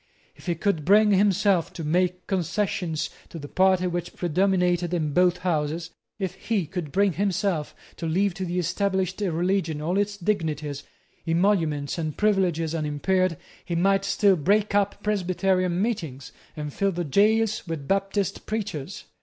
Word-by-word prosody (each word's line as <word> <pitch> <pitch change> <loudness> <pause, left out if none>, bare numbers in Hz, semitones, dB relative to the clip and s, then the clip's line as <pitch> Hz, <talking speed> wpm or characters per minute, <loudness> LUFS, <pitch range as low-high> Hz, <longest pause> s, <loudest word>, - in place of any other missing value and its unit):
If - - -16
he 175 - +1
could 170 -2 0
bring 210 +5 +5
himself 200 -2 +3
to 165 - -6
make 180 +3 0
concessions 180 -3 -1 0.2
to - - -8
the 145 -2 -7
party 185 +2 +3
which 175 -1 -3
predominated 180 0 +1
in 155 -4 -1
both 180 +2 +3
Houses, 165 -1 -2 0.3
if 190 -4 -3
he 210 -6 +1
could 160 -2 -5
bring 200 +1 +2
himself 190 -3 -1 0.2
to 165 - -3
leave 190 +4 +1
to 185 +1 -4
the 175 +1 -3
established 190 +2 -1
religion 175 -3 0
all 175 +6 0
its 205 0 -1
dignities, 155 -7 -2 0.5
emoluments, 165 -4 +1
and 155 -2 -3
privileges 180 -6 +1
unimpaired, 165 +3 0 0.3
he 170 - -3
might 195 +3 +3
still 195 0 +3
break 200 +6 +1
up 200 0 +1
Presbyterian 185 -3 +1
meetings, 160 - -3 0.3
and 150 -1 -5
fill 200 0 +1
the 175 -1 -2
gaols 215 +6 +2
with 155 -4 -5
Baptist 195 0 -1
preachers. 200 -5 -4
180 Hz, 150 wpm, -25 LUFS, 165-195 Hz, 0.5 s, bring